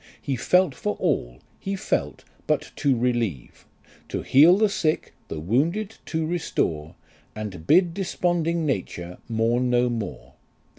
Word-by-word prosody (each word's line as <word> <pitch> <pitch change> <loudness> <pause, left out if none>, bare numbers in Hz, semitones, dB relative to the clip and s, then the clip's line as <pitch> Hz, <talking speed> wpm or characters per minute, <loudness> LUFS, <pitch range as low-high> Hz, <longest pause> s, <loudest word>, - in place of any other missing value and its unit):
He 140 - -2
felt 180 +5 +3
for 105 -5 -3
all - - -1 0.2
he 195 +1 -3
felt 190 - -2 0.2
but - - 0
to 135 -3 +2
relieve, 115 - -2 0.4
To - - -3
heal 160 +7 +6
the 215 +1 +4
sick 160 -6 -1
the 80 - -5
wounded 165 - 0
to 160 -1 -1
restore, 85 - -2 0.4
And 100 -6 -6
bid 175 0 +5
desponding 170 -3 0
nature 90 - -3
mourn 115 +2 +1
no 125 0 +2
more. 110 -5 -5
130 Hz, 135 wpm, -24 LUFS, 105-170 Hz, 0.4 s, heal